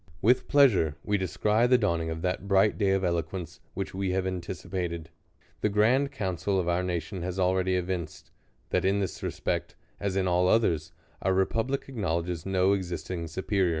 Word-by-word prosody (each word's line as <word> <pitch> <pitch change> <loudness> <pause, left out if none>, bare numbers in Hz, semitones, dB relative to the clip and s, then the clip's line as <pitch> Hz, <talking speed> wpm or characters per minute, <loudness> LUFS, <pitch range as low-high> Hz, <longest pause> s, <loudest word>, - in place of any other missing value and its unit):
With 125 +7 +3
pleasure 105 - +4
we 105 -1 0
descry 105 +5 +2
the 125 0 +5
dawning 85 -7 0
of 80 0 -5
that 90 +1 -2
bright 100 +1 +4
day 100 -2 +3
of 95 0 +2
eloquence, 85 0 -2 0.2
which 95 - -4
we 95 0 -1
have 95 0 0
anticipated. 90 -2 -4 0.5
The 105 - +1
grand 120 +7 +3
council 95 -4 -1
of 90 - -1
our 85 +1 +2
nation 90 +1 -3
has 90 +1 -4
already 95 0 +2
evinced, 90 -3 -4 0.4
that - - +2
in 100 +2 +2
this 95 -3 -3
respect, - - -2 0.2
as 100 -2 -2
in 95 -1 +1
all 90 0 +3
others, 85 -7 +2 0.3
our 95 0 +1
republic 115 +8 0
ac 130 -4 -8
knowledges 85 -2 -1
no 95 0 +3
existing 90 -2 -3
supeH<n'. 95 +3 0
95 Hz, 175 wpm, -28 LUFS, 85-100 Hz, 0.5 s, the